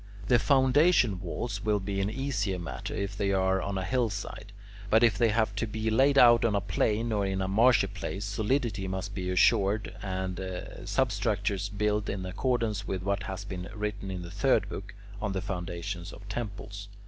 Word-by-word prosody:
The 120 -2 +6
foundation 130 - +4
walls 100 +2 -4
will 105 -1 +2
be 100 0 -2
an 95 - 0
easier 110 -6 -1
matter 70 -8 -5
if 100 0 -3
they 100 -1 0
are 95 0 +2
on 100 -1 -3
a 95 - -2
hillside; 105 -3 -2 0.4
but 110 +3 +5
if 115 -2 +5
they 115 -2 +3
have 110 -1 +1
to 115 - -1
be 110 +1 -2
laid 135 +5 +4
on 120 -3 +6
a - - +3
plain 110 +3 0
or 105 -2 +1
in 95 -1 -1
a 95 - -1
marshy 115 +6 +4
place, 100 +2 -5
solidity 105 -1 -1
must 95 +2 -4
be 90 -2 -3
assured 100 +3 +2
and 95 -2 -3 0.5
substructures 100 0 0
built 105 0 0
in 95 -1 -3
accordance 110 0 -1
with 95 -1 -3
what 100 +1 0
has 95 0 -5
been 95 -2 -6
written 105 -2 -3
in 90 -1 -4
the 85 - -8
third 130 +8 +2
book, 100 +1 -7 0.3
on 105 -2 -1
the 95 - -1
foundations 90 -1 -5
of 105 - -12
temples. 105 -1 -6
100 Hz, 185 wpm, -29 LUFS, 95-110 Hz, 0.5 s, The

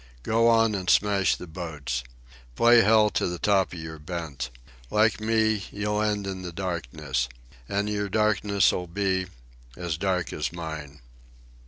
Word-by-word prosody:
Go 115 +1 +3
on 115 -1 +4
an' 95 -3 -3
smash 100 0 +3
the - - -8
boats. 80 -8 -4 0.5
Play 120 - +6
hell 105 0 +5
to - - 0
the 90 0 -3
top 95 0 +2
of 90 - -7
your 80 -1 -7
bent. 75 -6 -5 0.4
Like 110 +1 +2
me, 110 -2 +2
you'll 105 +1 -1
end 105 -2 0
in 95 -1 -4
the 90 -1 -6
darkness. 75 -8 -3 0.4
And 100 +1 0
your 105 -1 -2
darkness'll 100 -3 +2
be—as 85 -5 -4
dark 95 -2 -1
as 75 - -2
mine." 80 -4 -7
95 Hz, 145 wpm, -26 LUFS, 80-105 Hz, 0.5 s, Play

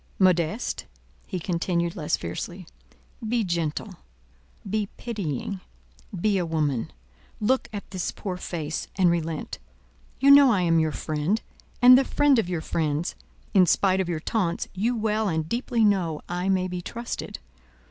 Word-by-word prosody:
Modeste," 185 +3 +1 0.4
he 185 - -3
continued 170 0 -1
less 150 -4 0
fiercely, 175 - -6 0.6
"be 235 -1 +2
gentle, 170 +2 -2 0.7
be 205 0 -1
pitying, 195 - -4 0.6
be 200 +1 +2
a - - 0
woman; 150 -7 -1 0.5
look 255 +5 +1
at 205 -2 -6
this 185 -3 -2
poor 190 -3 -5
face, 160 -4 -4
and 180 -3 +4
relent. 165 -2 -3 0.6
You 275 +2 +6
know 280 -2 +8
I 200 -5 +2
am 165 -2 +3
your 160 -1 +1
friend, 155 +8 -1 0.4
and 250 +1 +10
the - - +3
friend 280 -1 +3
of 180 - -1
your 175 -3 -2
friends; 155 +1 -1 0.4
in 185 -3 +6
spite 190 +2 +3
of 180 - -3
your 165 -2 -1
taunts, 175 0 -1
you 220 +6 0
well 215 -1 0
and 160 -2 -1
deeply 235 +1 +1
know 180 -7 +1
I 180 +2 -2
may 185 -1 +2
be 180 -1 -4
trusted. 235 +6 -5
185 Hz, 150 wpm, -25 LUFS, 165-215 Hz, 0.7 s, and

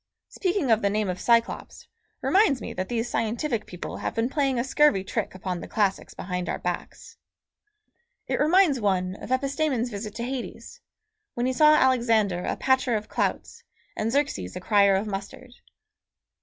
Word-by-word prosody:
Speaking 360 - -1
of 220 0 +4
the 200 - +2
name 210 -1 -1
of 180 0 -3
Cyclops 235 0 0 0.3
reminds 385 -9 +3
me - - -6
that 185 0 -4
these 235 0 -1
scientific 230 +1 -2
people 180 - -7
have - - -4
been 230 +2 0
playing 275 -3 0
a 235 - +1
scurvy 270 -6 +3
trick 190 - -3
upon 185 -2 -4
the - - -7
classics 200 -3 -1
behind 180 -1 -4
our - - -1
backs. - - -6 1.1
It - - -2
reminds 310 -4 +4
one 185 -2 0
of - - -9
Epistemon's 270 -2 0
visit 210 0 -6
to 235 - -4
Hades, 255 0 -6 0.5
when 240 - -1
he 260 - +1
saw 305 +3 +6
Alexander 230 -9 +2
a - - -1
patcher 260 -2 +2
of 210 0 -4
clouts 470 - -2 0.3
and 220 +1 -1
Xerxes 165 - -1
a - - -4
crier 200 0 +4
of 195 +3 0
mustard. 205 +5 -7
230 Hz, 170 wpm, -25 LUFS, 200-270 Hz, 1.1 s, saw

